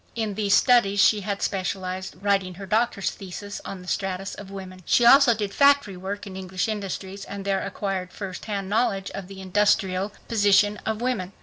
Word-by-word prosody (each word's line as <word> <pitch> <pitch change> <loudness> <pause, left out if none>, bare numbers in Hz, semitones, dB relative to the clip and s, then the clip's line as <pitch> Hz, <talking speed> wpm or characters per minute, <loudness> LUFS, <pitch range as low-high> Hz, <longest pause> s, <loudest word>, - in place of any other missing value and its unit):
In 220 -3 -2
these 200 -1 +2
studies 235 -6 +4
she 205 +2 +5
had 200 0 -3
specialized, 190 -1 -3
writing 195 -3 +1
her 195 +2 -8
doctor's 210 -1 0
thesis 200 +2 -8
on 185 -2 -7
the - - -14
status 195 0 -2
of 200 -2 -9
women. 190 -1 -9
She 240 - +3
also 265 -1 +7
did 205 -2 -3
factory 280 -8 +4
work 195 +3 -5
in 195 -2 -8
English 185 0 -3
industries 195 -2 -5
and 200 0 -7
there 195 -1 +1
acquired 190 -2 -3
first 190 -2 -7
hand 200 -3 -3
knowledge 200 -2 0
of 195 -2 -7
the 195 0 -10
industrial 190 0 +1 0.2
position 205 -2 +3
of 220 0 -2
women. 205 -7 -2
195 Hz, 185 wpm, -25 LUFS, 190-210 Hz, 0.2 s, also